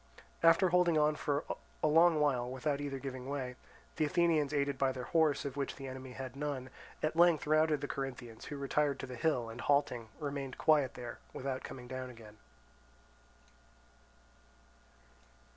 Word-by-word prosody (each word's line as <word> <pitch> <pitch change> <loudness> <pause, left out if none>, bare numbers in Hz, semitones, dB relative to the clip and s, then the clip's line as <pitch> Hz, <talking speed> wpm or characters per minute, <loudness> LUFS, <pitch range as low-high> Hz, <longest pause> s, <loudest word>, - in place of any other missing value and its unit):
After 165 +3 +6
holding 175 -2 +4
on 150 0 +3
for 145 0 -1 0.4
a - - +5
long 165 +1 +5
while 130 -5 +1
without 140 +2 -1
either 140 -1 -3
giving 130 -1 -6
way, 130 -3 -3 0.4
the 155 - +2
Athenians 160 -3 +2
aided 140 -2 0
by 135 -1 +3
their 130 -1 -5
horse, 155 -2 +2
of 140 -2 -4
which 140 -1 -2
the 135 -1 -7
enemy 130 -1 -7
had 130 +1 -7
none, 140 -3 -4 0.3
at 155 +1 0
length 170 -2 +5
routed 155 0 +3
the 145 - -3
Corinthians, 125 -5 -5
who 145 - -6
retired 140 0 0
to - - -4
the 125 -1 -7
hill 125 -3 +1
and, 115 +1 -7
halting, 140 -5 +1
remained 140 -3 -4
quiet 150 -4 +3
there, 120 -1 -7 0.2
without 130 -1 -3
coming 125 -2 -8
down 130 0 -5
again. 110 -3 -13
140 Hz, 160 wpm, -33 LUFS, 130-150 Hz, 0.4 s, After